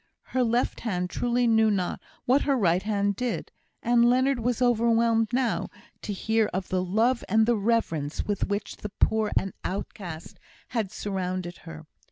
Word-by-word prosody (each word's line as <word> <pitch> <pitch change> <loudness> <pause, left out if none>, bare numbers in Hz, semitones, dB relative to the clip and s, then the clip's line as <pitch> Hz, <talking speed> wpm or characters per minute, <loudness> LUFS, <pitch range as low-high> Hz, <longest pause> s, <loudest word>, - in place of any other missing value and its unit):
Her 255 -1 +3
left 235 +1 0
hand 180 -5 -2
truly 245 0 +1
knew 220 -1 +4
not 190 -4 -1 0.2
what 265 +3 +4
her 275 -2 +1
right 180 -5 +2
hand 200 -1 0
did; 250 +3 -3 0.3
and 240 0 +4
Leonard 260 +1 +2
was 240 +1 0
overwhelmed 230 -2 +3
now 250 -1 0 0.3
to - - -4
hear 220 +2 +1
of 190 0 -3
the 185 0 0
love 225 +7 +1
and 220 +2 +4
the 240 +1 +3
reverence 200 -9 0
with 205 -2 -1
which 200 0 -3
the 210 - -6
poor 215 +1 +1
and 195 - 0
outcast 180 -4 -6 0.3
had 220 -6 -2
surrounded 185 -4 -3
her. 160 -1 -9
220 Hz, 165 wpm, -26 LUFS, 190-235 Hz, 0.3 s, knew